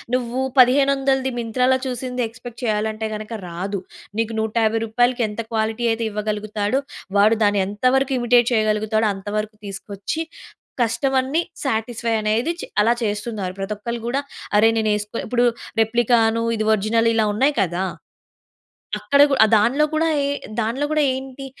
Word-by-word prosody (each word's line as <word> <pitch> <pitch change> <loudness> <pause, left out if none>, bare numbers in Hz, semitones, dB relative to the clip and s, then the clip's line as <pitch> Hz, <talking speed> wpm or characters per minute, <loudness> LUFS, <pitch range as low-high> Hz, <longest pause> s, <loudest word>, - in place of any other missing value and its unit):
నువ్వు 250 0 -2 0.2
1500ది 270 0 +4
మింత్రా‌లో 250 +3 +2
చూసింది 250 0 -3
ఎక్స్‌పేక్ట్ 240 +2 -11
చేయాలంటే 215 0 -1
గనుక 215 +2 -7
రాదు. 190 +3 -4 0.4
నీకు 225 0 -1
నూట 220 -1 -2
50 225 +1 +1
రూపాయలకి 245 +2 +1
ఎంత 210 - -8
క్వాలిటీ 220 +1 -1
అయితే 225 +1 -1
ఇవ్వగలుగుతాడో 210 +3 -1 0.4
వాడు 215 +3 +5
దాన్ని 205 -1 +3
ఎంతవరకు 255 +6 +1
ఇమిటేట్ 240 0 +4
చేయగలుగుతాడో 215 0 +1
అంత 195 +1 -11
వరకు 215 0 -3
తీసుకొచ్చి 200 +8 -5 0.6
కస్టమర్‌ని 265 +6 +1 0.2
సాటిస్ఫై 230 -2 -1
అనేది 220 +8 +1
చె - - -5 0.2
అలా 230 +3 +4
చేస్తున్నారు. 210 -3 -3
ప్రతి 195 +2 -3
ఒక్కళ్ళు 235 +3 -5
కూడా 265 +3 0 0.4
అరే 225 +2 +6
నేను 220 -1 +1
వేసుకో 210 +2 -3
ఇప్పుడు 245 +1 +1 0.3
రెప్లికాను 230 0 +3
ఇది 215 - -1
ఒరిజినల్ 225 +2 +2
ఇలా 220 -1 +3
ఉన్నాయి 270 +7 +2
కదా! 180 0 -1 1.2
అక్కడ 280 0 +3
కూడా 270 - +1
ఆహ్, - - 0
దాంట్లో 260 +8 +3
కూడా 320 +1 +2 0.2
ఏ - - 0 0.3
దాంట్లో 245 +7 -1
కూడా 305 -1 +2
ఏంటి? 265 +1 -7
225 Hz, 145 wpm, -21 LUFS, 215-255 Hz, 1.2 s, అరే